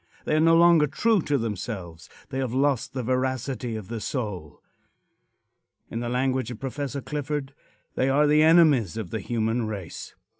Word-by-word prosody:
They -, -, +1 dB
are -, -, +3 dB
no 165 Hz, +1 st, +5 dB
longer 170 Hz, -3 st, +6 dB
true 215 Hz, +8 st, +2 dB
to 145 Hz, -2 st, 0 dB
themselves. 100 Hz, -7 st, -5 dB, 0.2 s
They 135 Hz, 0 st, -3 dB
have 130 Hz, -2 st, -2 dB
lost 135 Hz, -3 st, +1 dB
the 130 Hz, -, -2 dB
veracity 130 Hz, -1 st, -2 dB
of 105 Hz, -4 st, -7 dB
the 115 Hz, 0 st, -5 dB
soul. 100 Hz, -, -4 dB, 1.3 s
In 115 Hz, -, -3 dB
the 120 Hz, 0 st, -3 dB
language 130 Hz, -1 st, 0 dB
of 120 Hz, -3 st, -7 dB
Prof. 140 Hz, +1 st, -4 dB
Clifford, 145 Hz, -1 st, -3 dB, 0.4 s
"they 130 Hz, -, +1 dB
are 145 Hz, +3 st, +4 dB
the 150 Hz, +1 st, +4 dB
enemies 155 Hz, -, +5 dB
of 105 Hz, -6 st, -5 dB
the 110 Hz, -, -2 dB
human 115 Hz, +1 st, -1 dB
race." 100 Hz, -6 st, -7 dB
130 Hz, 165 wpm, -25 LUFS, 110-145 Hz, 1.3 s, longer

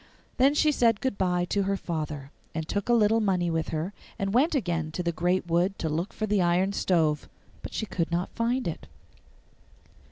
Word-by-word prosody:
Then 275 Hz, +3 st, +4 dB
she 305 Hz, 0 st, +4 dB
said 230 Hz, -6 st, +3 dB
good 260 Hz, -5 st, -1 dB
bye 180 Hz, -2 st, +1 dB
to 200 Hz, -, +1 dB
her 195 Hz, 0 st, 0 dB
father, 155 Hz, -6 st, -4 dB, 0.2 s
and 160 Hz, -1 st, -3 dB
took 200 Hz, +5 st, -2 dB
a -, -, +5 dB
little 225 Hz, -1 st, +4 dB
money 185 Hz, -5 st, +1 dB
with 165 Hz, -1 st, -1 dB
her, 160 Hz, +5 st, -3 dB, 0.2 s
and 195 Hz, 0 st, -2 dB
went 295 Hz, +7 st, +3 dB
again 175 Hz, -, 0 dB
into 155 Hz, +3 st, -4 dB
the 170 Hz, -, 0 dB
great 175 Hz, +2 st, 0 dB
wood 175 Hz, +3 st, +1 dB
to 160 Hz, -, -2 dB
look 165 Hz, +6 st, -2 dB
for 215 Hz, -, -3 dB
the 205 Hz, -2 st, +2 dB
iron 180 Hz, +3 st, +2 dB
stove; 160 Hz, -6 st, +1 dB, 0.3 s
but -, -, -7 dB
she 220 Hz, -, -1 dB
could 170 Hz, -5 st, -2 dB
not 175 Hz, +2 st, -1 dB
find 240 Hz, +1 st, 0 dB
it. 165 Hz, -, -5 dB
185 Hz, 200 wpm, -27 LUFS, 170-215 Hz, 0.3 s, a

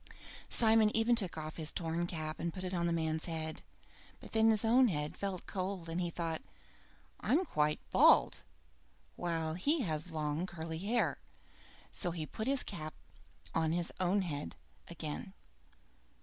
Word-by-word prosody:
Simon 220 Hz, -2 st, +5 dB
even 230 Hz, +2 st, +4 dB
took 190 Hz, -8 st, 0 dB
off 155 Hz, 0 st, -5 dB
his 160 Hz, -1 st, 0 dB
torn 170 Hz, 0 st, -2 dB
cap 155 Hz, -2 st, -4 dB
to 170 Hz, -, -1 dB
put 185 Hz, +2 st, -6 dB
it 185 Hz, 0 st, -3 dB
on 170 Hz, -1 st, +1 dB
the -, -, +1 dB
man's 160 Hz, -1 st, 0 dB
head, 160 Hz, -2 st, -3 dB, 0.6 s
but -, -, -12 dB
then 220 Hz, 0 st, +5 dB
his 220 Hz, -1 st, +3 dB
own 250 Hz, +3 st, +6 dB
head 150 Hz, -6 st, -2 dB
felt 195 Hz, -3 st, -4 dB
cold, 185 Hz, -3 st, -3 dB
and 165 Hz, +2 st, -1 dB
he 175 Hz, -, -1 dB
thought: 165 Hz, -1 st, -3 dB, 0.8 s
"I'm 330 Hz, +9 st, +2 dB
quite 150 Hz, -, +1 dB
bald, -, -, +6 dB, 0.8 s
while 165 Hz, -2 st, -1 dB
he 285 Hz, -, +1 dB
has 160 Hz, -5 st, -2 dB
long 155 Hz, +2 st, -2 dB
curly 160 Hz, -2 st, -5 dB
hair." 220 Hz, +6 st, +1 dB, 0.7 s
So 180 Hz, -, -1 dB
he 165 Hz, -2 st, -3 dB
put 220 Hz, +9 st, -5 dB
his 275 Hz, -1 st, +2 dB
cap 155 Hz, -5 st, -6 dB, 0.6 s
on 160 Hz, -1 st, +2 dB
his 175 Hz, 0 st, -1 dB
own 185 Hz, +2 st, +2 dB
head 145 Hz, -, -4 dB, 0.3 s
again. 170 Hz, +3 st, -5 dB
170 Hz, 160 wpm, -34 LUFS, 160-200 Hz, 0.8 s, own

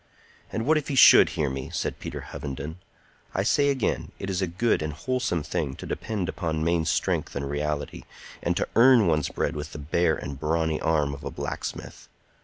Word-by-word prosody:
"And 110 Hz, -, -2 dB
what 155 Hz, +2 st, +4 dB
if 145 Hz, -, -9 dB
he 140 Hz, -, -2 dB
should -, -, +8 dB
hear 75 Hz, -, +1 dB
me?" 65 Hz, -1 st, -4 dB
said -, -, -3 dB
Peter -, -, -6 dB
Hovenden. 70 Hz, +3 st, -6 dB, 0.6 s
"I 95 Hz, -, +1 dB
say 145 Hz, +7 st, +3 dB
again, 135 Hz, -5 st, -1 dB
it 95 Hz, -, -4 dB
is 95 Hz, 0 st, -1 dB
a 95 Hz, -, +1 dB
good 95 Hz, +6 st, +1 dB
and 75 Hz, -1 st, -3 dB
a -, -, -11 dB
wholesome 120 Hz, -, -1 dB
thing 75 Hz, -3 st, -2 dB
to -, -, -9 dB
depend 105 Hz, -6 st, -3 dB
upon 80 Hz, -2 st, -2 dB
main 85 Hz, -1 st, +1 dB
strength 80 Hz, -, 0 dB
and 70 Hz, 0 st, -2 dB
reality, 75 Hz, 0 st, -3 dB, 0.4 s
and -, -, 0 dB
to -, -, 0 dB
earn 120 Hz, -2 st, +7 dB
one's 75 Hz, -4 st, +1 dB
bread 75 Hz, -, -2 dB
with 75 Hz, +1 st, -6 dB
the -, -, -6 dB
bare 80 Hz, +3 st, +1 dB
and 70 Hz, -1 st, -7 dB
brawny 80 Hz, 0 st, 0 dB
arm 75 Hz, -3 st, +1 dB
of 70 Hz, -, -9 dB
a -, -, -3 dB
blacksmith. -, -, -6 dB
80 Hz, 205 wpm, -26 LUFS, 75-100 Hz, 0.6 s, should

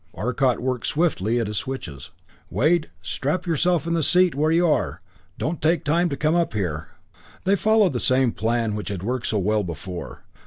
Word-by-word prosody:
Arcot 125 Hz, +6 st, 0 dB
worked 125 Hz, -1 st, -2 dB
swiftly 120 Hz, -, +1 dB
at 115 Hz, -, 0 dB
his 105 Hz, 0 st, -4 dB
switches. 85 Hz, -, -6 dB, 0.4 s
"Wade 155 Hz, +4 st, +2 dB
strap 140 Hz, -, -2 dB
yourself 170 Hz, 0 st, +1 dB
in 170 Hz, -, -1 dB
the 165 Hz, -, +1 dB
seat 180 Hz, +3 st, +4 dB
where 150 Hz, +3 st, +1 dB
you 170 Hz, +2 st, +3 dB
are 155 Hz, -, 0 dB, 0.4 s
don't 160 Hz, +2 st, -3 dB
take 160 Hz, +1 st, +2 dB
time 170 Hz, +4 st, +2 dB
to 140 Hz, -, -3 dB
come 155 Hz, +1 st, +1 dB
up 170 Hz, -8 st, +1 dB
here." 80 Hz, -7 st, -3 dB, 0.6 s
They 195 Hz, +2 st, +3 dB
followed 215 Hz, -3 st, +3 dB
the 120 Hz, -, -1 dB
same 130 Hz, -1 st, +3 dB
plan 115 Hz, 0 st, -1 dB
which 105 Hz, 0 st, -4 dB
had 95 Hz, -3 st, -4 dB
worked 125 Hz, +2 st, -2 dB
so 110 Hz, -, 0 dB
well 105 Hz, +2 st, +1 dB
before. 90 Hz, +1 st, -7 dB
130 Hz, 190 wpm, -23 LUFS, 105-170 Hz, 0.6 s, seat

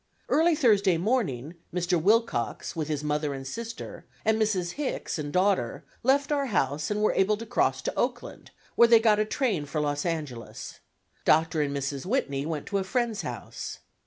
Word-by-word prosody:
Early 330 Hz, +1 st, +4 dB
Thursday 205 Hz, -, +4 dB
morning 170 Hz, -, -1 dB, 0.2 s
Mr. 175 Hz, -1 st, 0 dB
Wilcox, 210 Hz, -, +1 dB
with 155 Hz, -3 st, -2 dB
his 150 Hz, -2 st, -2 dB
mother 150 Hz, -1 st, -1 dB
and 135 Hz, 0 st, -7 dB
sister, 230 Hz, -, -6 dB, 0.2 s
and 220 Hz, 0 st, +2 dB
Mrs. 190 Hz, -5 st, +1 dB
Hicks 280 Hz, -, -3 dB
and 145 Hz, -1 st, -4 dB
daughter 185 Hz, -, +1 dB, 0.2 s
left 280 Hz, +3 st, +2 dB
our 285 Hz, -2 st, +1 dB
house 145 Hz, -, 0 dB
and 210 Hz, 0 st, 0 dB
were -, -, +3 dB
able 205 Hz, +2 st, +2 dB
to 230 Hz, -, -7 dB
cross 245 Hz, -, +1 dB
to -, -, -2 dB
Oakland, -, -, -3 dB, 0.2 s
where 235 Hz, -, +6 dB
they 230 Hz, -1 st, +7 dB
got 220 Hz, -2 st, +4 dB
a 215 Hz, -, +2 dB
train 210 Hz, -, -1 dB
for 150 Hz, +3 st, -2 dB
Los 145 Hz, -1 st, -1 dB
Angeles. 150 Hz, -9 st, -5 dB, 0.4 s
Dr. 160 Hz, 0 st, +3 dB
and 140 Hz, -1 st, -1 dB
Mrs. 140 Hz, +3 st, -3 dB
Whitney 145 Hz, -, -1 dB
went 155 Hz, -3 st, -3 dB
to 200 Hz, -, +1 dB
a -, -, -1 dB
friend's 235 Hz, +1 st, -1 dB
house. -, -, -6 dB
185 Hz, 180 wpm, -27 LUFS, 150-225 Hz, 0.4 s, they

